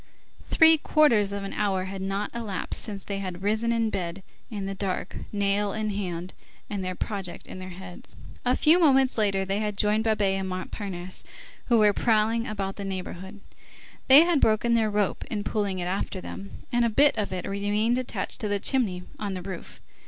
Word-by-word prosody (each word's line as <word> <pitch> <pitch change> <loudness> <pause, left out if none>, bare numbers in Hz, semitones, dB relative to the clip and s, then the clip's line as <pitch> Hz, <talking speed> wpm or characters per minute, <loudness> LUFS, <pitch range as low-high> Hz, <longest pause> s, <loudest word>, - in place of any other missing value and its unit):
Three 320 -1 +6
quarters 235 -11 +3
of 200 0 -4
an 195 - -5
hour 195 -3 0
had 190 0 -6
not 195 +2 -2
elapsed 220 -5 -2
since 200 -3 -4
they 200 -1 -3
had 185 -1 -5
risen 220 +3 +1
in 230 -1 +1
bed 180 +1 -4 0.3
in 205 -4 -4
the 195 - -3
dark, 190 -1 -3 0.2
nail 200 0 +1
in 215 -1 -2
hand, 180 -3 -4 0.4
and 200 -2 -2
their 185 0 -3
project 195 -2 -4
in - - -9
their 185 0 -7
heads. 180 0 -11 0.3
A 250 +1 +2
few 325 +4 +5
moments 270 -7 +4
later 195 -2 +1
they 195 +2 -1
had 210 -2 -2
joined 210 +1 +2
Babet 205 -3 +2
and 190 0 -3
Montparnasse, 185 0 -4 0.4
who 235 - +3
were 210 -2 +5
prowling 225 +2 +2
about 195 -2 -4
the 200 - -5
neighborhood. 190 +1 -6 0.7
They 270 +3 +10
had 335 -3 +3
broken 220 +2 +3
their 225 -2 +3
rope 205 -2 0
in 205 -2 -2
pulling 205 -3 -1
it 175 - -3
after 185 +3 -2
them, 90 +2 -8 0.2
and 240 0 +2
a 235 - +3
bit 280 +7 +4
of 205 -3 -2
it 185 -2 -4
remained 205 +4 +1
attached 255 - -4
to 215 - -1
the 205 0 0
chimney 200 -8 0 0.2
on 200 -2 -3
the 180 - -6
roof. 185 -2 -8
205 Hz, 195 wpm, -26 LUFS, 190-220 Hz, 0.7 s, They